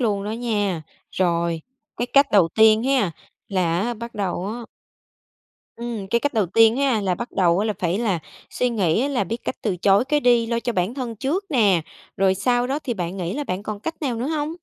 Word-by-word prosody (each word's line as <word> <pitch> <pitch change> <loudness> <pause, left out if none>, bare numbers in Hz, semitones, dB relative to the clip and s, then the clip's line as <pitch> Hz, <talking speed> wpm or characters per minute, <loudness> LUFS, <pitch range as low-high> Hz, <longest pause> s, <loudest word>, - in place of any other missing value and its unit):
luôn 205 -5 0
đó 210 - -3
nha. 205 -7 -1 0.3
Rồi, 170 -2 0 0.4
cái 240 - -1
cách 275 +2 +4
đầu 190 -5 +5
tiên 220 +4 +5
ha, 260 -8 +2 0.4
là 175 -4 +1
á 240 +4 -1
bắt 235 +1 -8
đầu 190 -3 -2
á 225 +4 -4 1.2
ừm, 235 -4 -5
cái 235 +4 +2
cách 290 0 -1
đầu 215 -4 +2
tiên 225 +5 +4
ha, 270 -5 +2
là 190 -3 0
bắt 240 +6 -6
đầu 180 0 +2
là 215 0 0
phải 180 +1 0
là 210 -7 0 0.3
suy 250 - 0
nghĩ 220 - +1
là 255 -8 0
biết 225 +5 -3
cách - - -3
từ 200 -5 -1
chối 195 +5 +3
cái 295 +2 +1
đi, 240 -3 +3
lo 235 0 -1
cho 240 - -2
bản 185 +3 -1
thân 245 -4 -5
trước 295 - -1
nè, 205 - +3 0.3
rồi 190 0 +3
sau 245 +5 +1
đó 275 +3 -1
thì 240 - -2
bạn 180 -2 -4
nghĩ 180 -1 -3
là 295 +2 -3
bạn 185 -5 -3
còn 210 -1 -5
cách 325 +7 -6
nào 255 -5 -1
nữa 235 +3 -2
hông? 310 0 -2
220 Hz, 220 wpm, -22 LUFS, 190-245 Hz, 1.2 s, đầu